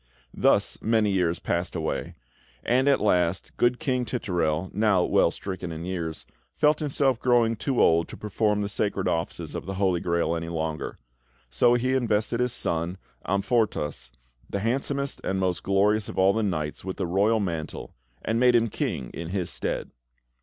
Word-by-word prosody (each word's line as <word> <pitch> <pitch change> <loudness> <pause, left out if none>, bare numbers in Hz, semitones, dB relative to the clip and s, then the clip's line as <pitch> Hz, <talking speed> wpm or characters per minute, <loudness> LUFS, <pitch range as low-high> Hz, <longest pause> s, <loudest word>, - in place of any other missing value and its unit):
Thus - - +2
many 110 -2 +2
years 90 -3 +1
passed 85 +1 -2
away; 80 -2 -3 0.5
and, 130 +3 +2
at 140 - +4
last, 90 -3 +1
good 120 0 +2
King 130 -3 0
Titurel, 90 -8 -1
now 105 -3 +3
well - - +3
stricken 95 -3 -6
in 80 +1 -6
years, 85 -4 -4 0.3
felt 150 0 +3
himself 135 -4 +1
growing 120 -2 +3
too 130 +3 -1
old 85 0 +4
to - - -9
perform 105 0 0
the - - -1
sacred 100 -1 -1
offices 80 0 -2
of - - -6
the 95 - -3
Holy 95 -2 +1
Grail 85 -1 0
any 85 0 -4
longer; 80 -1 -3 0.5
so 120 - +4
he 130 +2 +1
invested 115 -2 +1
his 125 0 +1
son, 85 0 -2 0.3
Amfortas, 100 -5 0 0.4
the 100 - -2
handsomest 140 +4 -1
and 95 0 -1
most 90 -2 0
glorious 100 +2 +2
of - - -8
all 95 +1 +5
the 110 - 0
knights, 75 -8 -2
with 95 0 -5
the 95 - -1
royal 100 +6 +2
mantle 85 -6 -4 0.3
and 115 +1 0
made 125 0 +5
him 115 -1 +3
King 65 -10 -3
in 85 0 -6
his 90 -2 -2
stead. - - -3
100 Hz, 170 wpm, -26 LUFS, 85-115 Hz, 0.5 s, all